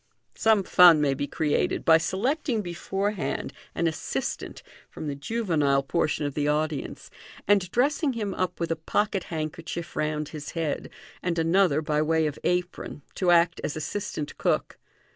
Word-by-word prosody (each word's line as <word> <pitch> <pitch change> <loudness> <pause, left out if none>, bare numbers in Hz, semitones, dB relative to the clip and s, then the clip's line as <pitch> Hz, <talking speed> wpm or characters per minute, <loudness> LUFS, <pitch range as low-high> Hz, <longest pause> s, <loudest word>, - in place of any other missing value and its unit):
Some 220 -3 +3
fun 175 -4 +7
may 145 -2 +2
be 145 +1 -3
created 150 -1 0
by 160 0 +7
selecting 230 - -1
beforehand 195 -2 -3 0.2
an 170 - 0
assistant 160 -1 -3 0.3
from - - -8
the 145 - -2
juvenile 145 -5 +1
portion 150 0 0
of 145 - -2
the 145 0 0
audience, 150 -1 -2 0.4
and 195 -3 +3
dressing 280 - +1
him 210 -4 -3
up 185 -1 -2
with 170 -1 -2
a - - +2
pocket 195 +4 -1
handkerchief 165 +1 -5
round 150 -1 -1
his 150 -2 -7
head, 165 -3 -2 0.3
and 175 -1 -1
another 165 -2 +3
by 150 0 +1
way 160 +1 +2
of 150 -2 -3
apron, 180 -4 -2
to 185 - 0
act 170 0 +4
as 145 - -2
assistant 155 -1 -4
cook. - - 0
165 Hz, 155 wpm, -26 LUFS, 150-190 Hz, 0.4 s, fun